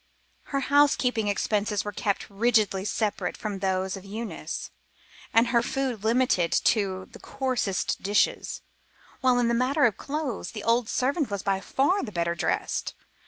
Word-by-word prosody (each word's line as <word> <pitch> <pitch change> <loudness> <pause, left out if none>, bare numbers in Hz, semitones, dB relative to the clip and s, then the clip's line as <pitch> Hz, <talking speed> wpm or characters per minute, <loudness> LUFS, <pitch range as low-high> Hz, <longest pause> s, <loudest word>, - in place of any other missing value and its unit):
Her 275 -1 -2
housekeeping 270 -6 +3
expenses 205 0 0
were 205 - -3
kept 200 0 -2
rigidly 210 -2 +1
separate 215 0 -1
from 205 -3 -4
those 190 0 0
of 195 - -9
Eunice 215 +3 -5 0.6
and 230 +1 +4
her 235 -2 +3
food 245 -3 -2
limited 225 -7 +2
to 190 -4 +1
the - - -12
coarsest 255 -8 -1
dishes, 205 +2 0 0.6
while 255 -1 +3
in 245 -1 +2
the 235 - +2
matter 260 +5 +3
of 220 -5 +2
clothes, 285 -5 -4
the 210 -2 -6
old 230 0 +2
servant 280 +2 0
was 200 -2 -3
by 195 -1 +1
far 280 - +1
the 210 - -5
better 170 -2 0
dressed. 170 - -2
220 Hz, 155 wpm, -26 LUFS, 200-255 Hz, 0.6 s, and